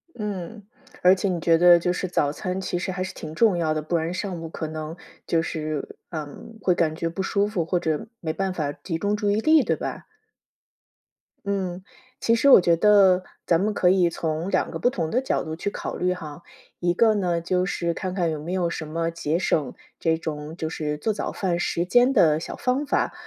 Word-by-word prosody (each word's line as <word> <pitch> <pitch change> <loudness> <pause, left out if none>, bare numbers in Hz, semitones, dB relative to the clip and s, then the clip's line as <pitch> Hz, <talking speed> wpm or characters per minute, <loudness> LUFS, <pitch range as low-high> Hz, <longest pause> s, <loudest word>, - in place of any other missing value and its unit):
嗯， 210 -1 -5 0.4
而 185 +1 +6
且 195 +1 -1
你 175 -2 -1
觉 165 0 +4
得 175 0 +7
就 175 +1 0
是 185 - -3
早 145 -5 +1
餐 185 +4 -4
其 180 -2 -2
实 185 +1 -3
还 185 0 -3
是 190 - -6
挺 155 0 -8
重 205 -1 +3
要 160 -2 +1
的， 155 - -2
不 165 +3 -2
然 165 +2 -1
上 180 -3 -4
午 165 - -6
可 160 -1 -5
能 155 +1 -6 0.3
就 165 -1 +1
是， 155 -3 -4
嗯， 170 +9 -8
会 180 -2 +2
感 160 -2 +1
觉 165 0 -2
不 180 +3 -3
舒 200 0 +1
服， 185 -6 -2
或 175 +1 0
者 160 +1 -2
没 160 -2 -3
办 190 +1 -2
法 150 -5 -2
集 165 -4 -5
中 205 +4 0
注 205 -1 0
意 210 - +1
力， 310 +3 +5
对 - - +1
吧？ - - -6 1.4
嗯， 190 -2 -2 0.4
其 230 - +3
实 280 +4 +4
我 190 - +9
觉 170 -1 +3
得 195 -2 +5 0.2
咱 165 -1 +4
们 210 +2 0
可 180 - +3
以 180 -2 +3
从 160 +3 -2
2 - - +1
个 - - -5
不 245 - +2
同 165 -8 -2
的 245 - +1
角 265 - -1
度 160 0 -5
去 200 +4 -3
考 - - -5
虑 180 0 0
哈， 165 -2 -9 0.4
一 175 0 +1
个 220 +2 +4
呢， 175 -4 0
就 180 +2 0
是 170 -2 -2
看 185 -1 -4
看 175 -3 0
有 155 -2 -3
没 170 +4 -5
有 180 -2 +1
什 160 -2 -5
么 165 +1 -1
节 165 0 -1
省 150 -7 0 0.3
这 160 -1 +1
种 155 0 -5
就 160 -2 -3
是 150 -2 -3
做 220 - 0
早 210 - -3
饭 180 -3 -1
时 175 0 -1
间 245 +8 +4
的 155 - +4
小 - - -6
方 260 +3 0
法。 - - 0
175 Hz, 240 characters per minute, -24 LUFS, 160-195 Hz, 1.4 s, 我